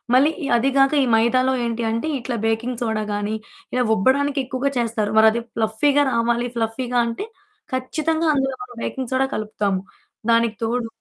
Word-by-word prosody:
మళ్ళీ 290 Hz, +5 st, +5 dB
ఈ -, -, -2 dB
అది 265 Hz, +4 st, +2 dB
కాక 275 Hz, +2 st, +4 dB
ఈ -, -, +2 dB
మైదాలో 255 Hz, +3 st, +3 dB
ఏంటి 230 Hz, 0 st, -2 dB
అంటే 230 Hz, +7 st, -2 dB
ఇట్లా 240 Hz, 0 st, -3 dB
బేకింగ్ 235 Hz, +2 st, -1 dB
సోడా 220 Hz, -2 st, -1 dB
గానీ 205 Hz, +1 st, -2 dB, 0.4 s
ఇలా 250 Hz, -, +2 dB
ఉబ్బడానికెక్కువగా 275 Hz, +3 st, +1 dB
చేస్తారు. 220 Hz, -3 st, -1 dB
మరది 220 Hz, +2 st, +5 dB
ఫ్లఫ్ఫీగా 230 Hz, +7 st, +2 dB
రావాలి 235 Hz, +1 st, +1 dB
ఫ్లఫ్ఫీగా 240 Hz, +2 st, -1 dB
అంటే 230 Hz, -, -4 dB, 0.5 s
ఖచ్చితంగా 315 Hz, +5 st, -1 dB
అందులో 270 Hz, -1 st, 0 dB
మనం 245 Hz, -1 st, -12 dB
బేకింగ్ 260 Hz, -1 st, -4 dB
సోడా 265 Hz, +1 st, +2 dB
కలుపుతాము 205 Hz, -3 st, -1 dB, 0.5 s
దానికి 230 Hz, -1 st, +3 dB
తోడు 235 Hz, +1 st, -1 dB
240 Hz, 155 wpm, -22 LUFS, 225-265 Hz, 0.5 s, మళ్ళీ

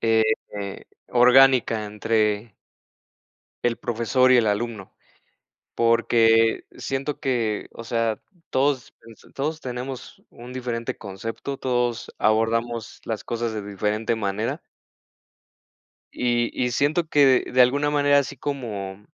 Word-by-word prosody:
eh, 110 Hz, -1 st, +3 dB, 0.8 s
orgánica 125 Hz, -2 st, +5 dB
entre 105 Hz, 0 st, -1 dB, 1.1 s
el 120 Hz, -1 st, +1 dB
profesor 120 Hz, +3 st, +2 dB
y -, -, +7 dB
el 120 Hz, -2 st, +3 dB
alumno 105 Hz, -1 st, -2 dB, 0.8 s
porque 115 Hz, -1 st, +3 dB
siento 135 Hz, +2 st, -3 dB
que, 115 Hz, -5 st, -1 dB
o 115 Hz, -, -9 dB
sea, 115 Hz, -2 st, -1 dB, 0.3 s
todos, 135 Hz, -1 st, 0 dB
pues, 115 Hz, -1 st, -16 dB
todos 155 Hz, +3 st, -2 dB
tenemos 130 Hz, -1 st, -7 dB
un 120 Hz, +2 st, -11 dB
diferente 120 Hz, -2 st, -4 dB
concepto, 115 Hz, +7 st, -6 dB
todos 120 Hz, -3 st, -1 dB
abordamos 115 Hz, +1 st, 0 dB
las 110 Hz, -3 st, -4 dB
cosas 120 Hz, -1 st, -2 dB
de 110 Hz, -, -3 dB
diferente 105 Hz, +3 st, -1 dB
manera. 105 Hz, +1 st, -2 dB, 1.5 s
Y 120 Hz, -1 st, 0 dB
y 125 Hz, -, +1 dB
siento 150 Hz, +6 st, +1 dB
que 140 Hz, -4 st, +4 dB
de 130 Hz, -, +3 dB
alguna 140 Hz, +4 st, +2 dB
manera, 145 Hz, -1 st, +4 dB
así 140 Hz, 0 st, -2 dB
como 105 Hz, -8 st, -5 dB
120 Hz, 115 wpm, -24 LUFS, 110-130 Hz, 1.5 s, y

